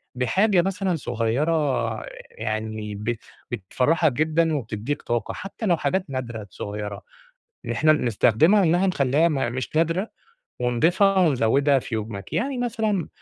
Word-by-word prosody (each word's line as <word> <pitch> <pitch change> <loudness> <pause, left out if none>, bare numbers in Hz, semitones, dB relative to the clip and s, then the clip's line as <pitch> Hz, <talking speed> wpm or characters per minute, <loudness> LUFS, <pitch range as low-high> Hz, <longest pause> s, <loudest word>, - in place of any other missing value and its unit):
بحاجة 185 - +3
مثلًا 190 0 -1
صغيرة، 135 +3 0 0.3
يعني 110 -1 -4
بت 110 +3 -3 0.3
بتفرحك 130 - +1
جدًا، 160 +3 +1
وبتديك 120 +2 -3
طاقة، 120 -2 -2
حتى 200 +3 -6
لو 175 -4 +3
حاجات 180 +6 0
نادرة 120 -5 -5
صغيرة، 105 +2 -5 0.7
إحنا 155 0 +4
بنستخدمها، 150 - +3
إنها 175 +3 +3
نخليّها 150 0 +2
م 135 -6 -1
مش 130 +4 -4
نادرة، 165 +6 +1 0.5
ونضيفها، 170 - +3
ونزوّدها 140 -3 +3
في 115 - -6
يومك؟ 105 -3 -5
يعني 250 - -1
مثلًا 220 - -1
145 Hz, 125 wpm, -24 LUFS, 115-175 Hz, 0.7 s, إحنا